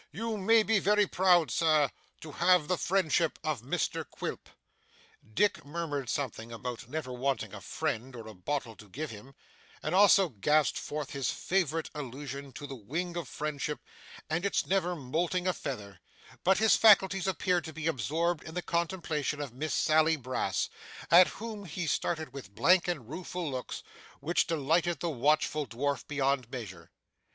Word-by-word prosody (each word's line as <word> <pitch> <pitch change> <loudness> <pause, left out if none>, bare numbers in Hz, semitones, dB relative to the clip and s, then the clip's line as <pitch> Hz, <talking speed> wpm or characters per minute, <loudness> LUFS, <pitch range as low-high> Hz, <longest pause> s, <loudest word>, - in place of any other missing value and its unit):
You 220 +7 -3
may 220 +2 +4
be 220 -1 +3
very 210 +2 +3
proud, 180 -7 +3
Sir, 155 0 +3 0.3
to 155 - -8
have 175 -1 +3
the 180 - +1
friendship 170 -3 +1
of 155 -7 -1
Mr 140 +9 -1
Quilp.' - - -6 0.8
Dick 205 0 +2
murmured 145 -4 -4
something 120 -5 -3
about 120 0 -6
never 145 -3 -4
wanting 130 +2 -2
a - - -8
friend 125 +3 -3
or 115 -2 -8
a 110 - -9
bottle 115 +4 -3
to 105 - -14
give 150 +6 -5
him, 115 +6 -12 0.5
and 155 - -2
also 195 -1 +6
gasped 150 +6 +2
forth 150 -2 -5
his 135 -2 -1
favourite 165 -4 -1
allusion 140 -1 -6
to 145 - -7
the 140 - -7
wing 160 - -4
of 170 -5 -4
friendship 150 0 -3 0.5
and 160 +2 -1
its 200 - +1
never 180 -2 +1
moulting 170 +6 -1
a 185 - +2
feather; 100 - -6 0.4
but 190 +1 +4
his 220 +1 +5
faculties 195 -3 +5
appeared 180 -1 +1
to 160 - -6
be 155 0 -6
absorbed 165 +4 0
in 160 - -9
the 180 - -2
contemplation 165 -4 -1
of 140 -5 -5
Miss 155 +5 -2
Sally 155 +1 +4
Brass, 130 -3 -1 0.4
at 175 +2 +9
whom 215 -2 -6
he 170 +1 -4
stared 155 -2 -1
with 100 -8 -9
blank 175 +11 +4
and 150 -10 -3
rueful 170 +1 -4
looks, 130 -1 -5 0.4
which 170 +3 +1
delighted 165 +1 +1
the 170 +1 -1
watchful 150 +2 +1
dwarf 130 +4 -2
beyond 135 -4 0
measure. 115 -8 -8
155 Hz, 165 wpm, -30 LUFS, 135-175 Hz, 0.8 s, at